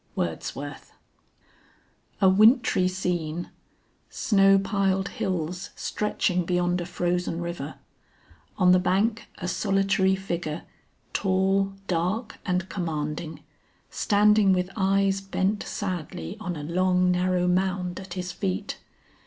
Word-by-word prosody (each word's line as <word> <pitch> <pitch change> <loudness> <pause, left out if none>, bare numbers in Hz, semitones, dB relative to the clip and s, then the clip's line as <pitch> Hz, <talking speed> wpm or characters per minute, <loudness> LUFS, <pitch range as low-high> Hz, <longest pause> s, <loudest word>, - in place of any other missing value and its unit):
WORDSWORTH. - - -4 1.3
A 190 - +6
wintry 215 -1 +5
scene. 175 -3 -2 0.6
Snow 195 -2 +4
piled 195 -1 0
hills 180 0 -3
stretching 185 -3 -1
beyond 175 0 0
a 170 - -5
frozen 175 -1 -1
river. 170 -4 -5 0.8
On 180 -2 +5
the 185 - +6
bank 200 +5 +1
a 180 - -4
solitary 190 +1 +2
figure 175 -4 -4 0.5
tall, 195 +1 +1
dark 185 +6 -2
and 185 0 0
commanding, 155 -3 -4 0.5
standing 210 -1 +4
with 180 0 -1
eyes 195 -1 +2
bent 195 +1 -1
sadly 170 - -4
on 180 -5 -4
a 150 - -6
long 180 +2 +2
narrow 180 0 +1
mound 180 0 0
at 190 -1 -8
his 180 -1 -4
feet. 95 - -3
185 Hz, 110 wpm, -26 LUFS, 175-195 Hz, 1.3 s, A